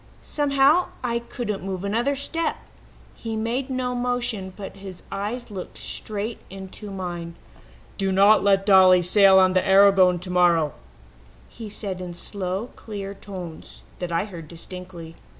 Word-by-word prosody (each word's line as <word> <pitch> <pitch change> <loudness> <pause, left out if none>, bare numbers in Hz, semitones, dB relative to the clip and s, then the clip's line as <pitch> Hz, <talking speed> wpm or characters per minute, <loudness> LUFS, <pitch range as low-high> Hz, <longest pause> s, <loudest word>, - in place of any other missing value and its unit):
Somehow 290 +3 +3 0.2
I 235 -1 0
couldn't 235 -3 -5
move 190 -1 -4
another 235 +8 0
step. 325 +4 -1 0.6
He 225 -1 -5
made 235 +5 -2
no 255 -1 -2
motion, 245 -6 -2
but 195 -1 -8
his 190 -2 -10
eyes 215 +4 -4
looked 190 -3 -7
straight 215 +2 -4
into 195 +2 -9
mine. 175 -3 -5 0.6
"'Do 195 -1 +1
not 200 +3 +5
let 195 -1 +3
Dolly 185 -2 +7
sail 195 +1 +6
on 185 -1 +5
the 185 - +3
Aragon 190 -2 +5
tomorrow,' 175 -4 +2 0.8
he 225 -2 -9
said 195 -3 -4
in 175 -1 -6
slow, 195 +4 -4
clear 200 -3 -7
tones 185 -5 -9 0.2
that 180 -1 -4
I 170 +4 0
heard 170 -6 -9
distinctly. 170 0 -9
195 Hz, 140 wpm, -24 LUFS, 185-225 Hz, 0.8 s, Dolly